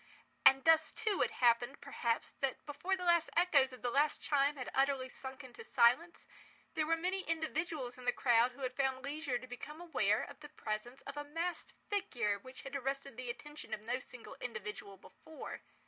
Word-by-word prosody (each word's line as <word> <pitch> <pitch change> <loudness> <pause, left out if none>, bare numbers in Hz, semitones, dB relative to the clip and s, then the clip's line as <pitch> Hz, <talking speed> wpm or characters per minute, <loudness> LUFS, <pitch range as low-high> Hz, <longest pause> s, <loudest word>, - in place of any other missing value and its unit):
And 270 0 +7
thus 320 -1 +6
too, 435 -4 -1
it - - +3
happened, 240 +2 +3
perhaps, 235 -5 -1
that 270 -2 -2
before 310 +6 -1
the 365 - -5
last 340 -2 +4
echoes 290 -7 +5
of 255 - -12
the 245 - 0
last 290 +4 +3
chime 285 0 +2
had 255 -3 -5
utterly 270 -1 +2
sunk 265 +2 -8
into 260 - -10
silence, 255 - +3 0.5
there 315 -2 0
were 330 +1 +3
many 370 +3 -1
individuals 315 -5 -2
in 250 - -10
the 245 - +4
crowd 240 0 +4
who 275 - -13
had 255 0 -1
found 265 -1 0
leisure 285 -3 -1
to 255 - -9
become 255 +5 -8
aware 345 -1 +1
of - - -9
the 295 -1 -10
presence 240 0 -5
of 280 +1 -7
a 290 - -2
masked 330 +4 -3 0.2
figure 230 - 0
which 255 +4 -11
had 275 0 -6
arrested 275 -1 -3
the 250 0 -6
attention 295 -1 -6
of 210 - -14
no 240 +4 -1
single 250 -1 -10
individual 210 -4 -6
before. 315 +10 -9
275 Hz, 195 wpm, -35 LUFS, 245-315 Hz, 0.5 s, And